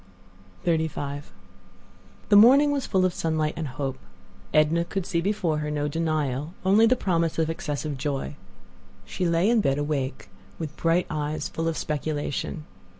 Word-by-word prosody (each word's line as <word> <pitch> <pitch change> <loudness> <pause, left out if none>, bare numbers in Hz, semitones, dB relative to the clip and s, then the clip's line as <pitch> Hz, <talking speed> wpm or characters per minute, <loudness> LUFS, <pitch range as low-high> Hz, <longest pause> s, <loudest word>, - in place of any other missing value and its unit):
XXXV 155 -4 -1 1.0
The 205 - +6
morning 270 +8 +7
was 280 -2 -1
full 185 -2 +2
of 185 - +1
sunlight 155 -2 -1
and 160 -2 -3
hope. 135 0 -4 0.5
Edna 155 +2 +3
could 190 +1 -4
see 170 -3 0
before 175 -5 0
her 150 0 -3
no 150 -1 -1
denial—only 160 - +1
the 255 - +4
promise 170 -8 0
of 160 0 +1
excessive 150 -3 -4
joy. 135 - -3 0.7
She 180 - -2
lay 170 +3 +2
in 230 -1 +4
bed 135 -6 +1
awake, 145 -2 -2 0.3
with 155 -2 -6
bright 165 +2 +2
eyes 150 0 -2
full 165 0 -3
of 165 - -1
speculation. 150 0 -3
160 Hz, 150 wpm, -25 LUFS, 145-180 Hz, 1.0 s, morning